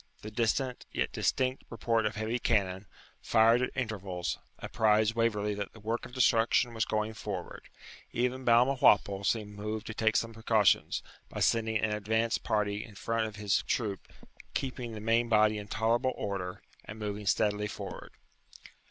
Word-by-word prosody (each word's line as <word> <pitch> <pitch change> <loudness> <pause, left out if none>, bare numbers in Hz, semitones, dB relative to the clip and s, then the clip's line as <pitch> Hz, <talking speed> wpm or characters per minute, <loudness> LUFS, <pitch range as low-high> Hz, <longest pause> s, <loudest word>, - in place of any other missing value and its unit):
The 110 - -7
distant 120 +3 -1
yet - - -1
distinct 130 0 0
report 115 -1 0
of - - -4
heavy 110 +3 -2
cannon, 100 -4 0 0.3
fired 115 +2 +4
at 125 - 0
intervals, 100 -7 -3 0.2
apprized 110 0 +2
Waverley 105 -3 0
that 100 -1 -5
the 115 - -13
work 115 +3 -3
of - - -17
destruction 120 -1 +3
was 110 -1 0
going 110 0 -1
forward. 100 -4 -6 0.4
Even 125 +2 -1
Balmawhapple 120 -5 +4
seemed 105 0 -1
moved 105 +1 -4
to 110 - -5
take 110 0 +1
some 115 0 0
precautions, 110 -3 +2 0.3
by - - -6
sending 110 -1 +2
an 110 0 0
advanced 110 +2 0
party 105 -1 0
in 105 - -13
front 115 +1 -1
of 110 - -9
his 105 -1 +1
troop, 105 -6 -2 0.4
keeping 125 -3 -3
the 110 - -6
main 115 +2 +2
body 110 -1 +4
in 105 - -8
tolerable 115 +5 +1
order, 95 -3 -4 0.2
and 105 - -9
moving 105 -1 -4
steadily 105 +1 +1
forward. - - -8
110 Hz, 160 wpm, -30 LUFS, 105-115 Hz, 0.4 s, fired